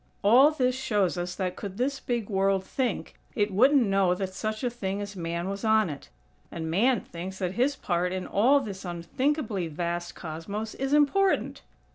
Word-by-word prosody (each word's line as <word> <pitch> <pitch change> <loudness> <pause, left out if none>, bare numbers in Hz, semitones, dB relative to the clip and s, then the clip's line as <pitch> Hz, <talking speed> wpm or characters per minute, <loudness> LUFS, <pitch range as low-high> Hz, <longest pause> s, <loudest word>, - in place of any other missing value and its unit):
All 245 +8 +7
this 255 -5 +1
shows 210 -9 0
us 175 0 -4
that 185 -1 -2
could 200 -2 -7
this 270 +3 -1
big 235 -4 -2
World 195 -1 +1
think, 255 +5 -3 0.2
it 205 -2 +1
wouldn't 260 +5 +5
know 195 -2 +2
that 190 0 -4
such 215 +4 -3
a 245 - +1
thing 200 -4 -3
as 205 0 -6
Man 170 0 -3
was 200 +2 -4
on 220 -5 +3
it. 140 - -10 0.4
And 160 -1 -4
Man 235 +7 +3
thinks 185 +3 -7
that 185 -2 -2
his 260 +7 +1
part 180 0 -1
in 185 0 -3
all 260 +8 +4
this 200 -6 -7
unthinkably 200 - -1
vast 170 +2 -3
Cosmos 190 +7 -5
is 270 +1 -3
important!! 370 +7 +2
200 Hz, 180 wpm, -27 LUFS, 180-250 Hz, 0.4 s, All